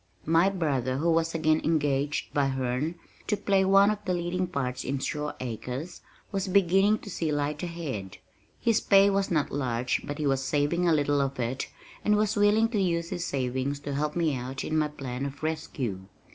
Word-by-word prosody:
My 165 +4 +4
brother 140 -9 -1
who 165 +4 +2
was 165 0 +1
again 155 -1 +2
engaged 145 -2 0
by 140 -1 +2
Herne 130 +4 -1 0.3
to 210 - +1
play 195 -1 +2
one 195 +2 +5
of 210 0 -4
the 185 -3 0
leading 175 +1 -1
parts 130 -7 -3
in 140 +2 -2
Shore 150 +2 -3
Acres 130 +7 -5 0.3
was 195 -1 -2
beginning 195 +2 +4
to - - -7
see 160 -3 -1
light 145 0 -1
ahead. 150 - -5 0.4
His 230 -2 +2
pay 200 0 +5
was 195 0 +1
not 155 -4 0
large 125 -3 -1
but 145 -1 -5
he 155 - -2
was 135 -1 +2
saving 150 +6 +1
a - - +4
little 145 -2 +2
of 135 -1 -2
it 125 +2 -2 0.3
and 210 - +3
was 215 +1 +1
willing 210 +2 +4
to 215 -4 0
use 170 -2 0
his 175 - -3
savings 130 +1 -2
to 145 0 -4
help 150 +2 -1
me 165 -4 +1
out 130 +2 -5
in 155 - -2
my 155 -1 +2
plan 135 -3 -5
of 140 +1 -6
rescue. 155 -10 -3
155 Hz, 195 wpm, -28 LUFS, 135-180 Hz, 0.4 s, one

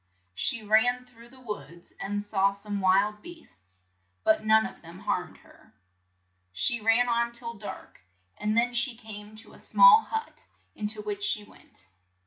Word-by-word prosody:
She 95 - -1
ran 245 +4 +2
through 235 -1 -18
the 260 +1 -15
woods, 175 - -9
and 205 +1 -3
saw 200 -1 +1
some 200 0 -5
wild 200 +3 +2
beasts, 95 - -14 0.5
but 215 0 +3
none 220 0 +4
of - - -9
them 170 +1 -12
harmed - - -3
her. - - -22 0.8
She 235 - +3
ran 225 +3 +3
on 235 0 0
till 235 -1 -4
dark, 205 - -10 0.3
and 210 +1 -1
then 245 +1 +2
she 240 0 0
came 215 -1 -10
to 220 - -12
a - - -14
small 485 -3 +7
hut, 445 0 -6 0.3
in 210 - -4
to 210 0 -3
which 205 -1 -5
she 210 - +1
went. 95 - -21
215 Hz, 165 wpm, -27 LUFS, 205-235 Hz, 0.8 s, small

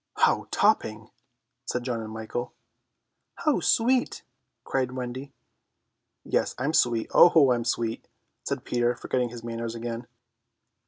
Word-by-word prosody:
"How - - +2
topping!" - - +1 0.5
said 125 - -3
John 120 -2 -2
and 110 -1 -7
Michael. 110 +3 -5 0.8
"How 305 -4 +1
sweet!" 250 +2 +2 0.4
cried 130 -2 -1
Wendy. 130 +2 -5 0.9
"Yes, - - 0
I'm 140 +5 -1
sweet, 120 -6 +2
oh, 160 -6 +7
I - - +6
am 120 - -2
sweet!" 115 -1 -2 0.4
said - - -4
Peter, 120 0 +1
forgetting 125 +1 -1
his 120 -1 -9
manners 115 0 -4
again. 115 +1 -5
120 Hz, 125 wpm, -26 LUFS, 115-130 Hz, 0.9 s, oh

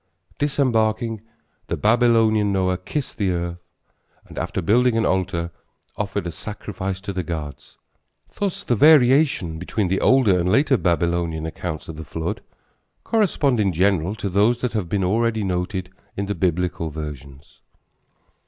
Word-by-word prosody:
Disembarking, 115 -6 +1 0.5
the - - -2
Babylonian 110 -2 +3
Noah 95 -1 0
kissed 135 +9 -4
the 100 -3 +1
earth 85 0 -3 0.7
and, - - -13
after - - -3
building 115 +6 +3
an 115 - +2
altar, 90 -2 -1 0.4
offered 100 -2 -3
a 85 - -3
sacrifice 95 +1 -5
to 100 0 -5
the 95 - -1
gods. 80 -4 -7 0.6
Thus 200 -3 -3
the 120 - +1
variations 130 - +4
between 95 +2 -2
the 95 - 0
older 110 -6 +4
and 90 +1 +1
later 135 +1 +4
Babylonian 85 -3 0
accounts 80 0 -5
of 80 - -8
the 80 - -6
flood 80 +1 -4 0.6
correspond 155 - +1
in 100 -3 +2
general 95 +1 +1
to 105 - -4
those 105 +6 +2
that 125 - -1
have 100 -7 -2
been 100 0 0
already 110 +3 +1
noted 90 0 -2 0.3
in 100 - -1
the 100 - -2
Biblical 90 -3 -1
versions. 70 -3 -9
95 Hz, 145 wpm, -22 LUFS, 85-115 Hz, 0.7 s, variations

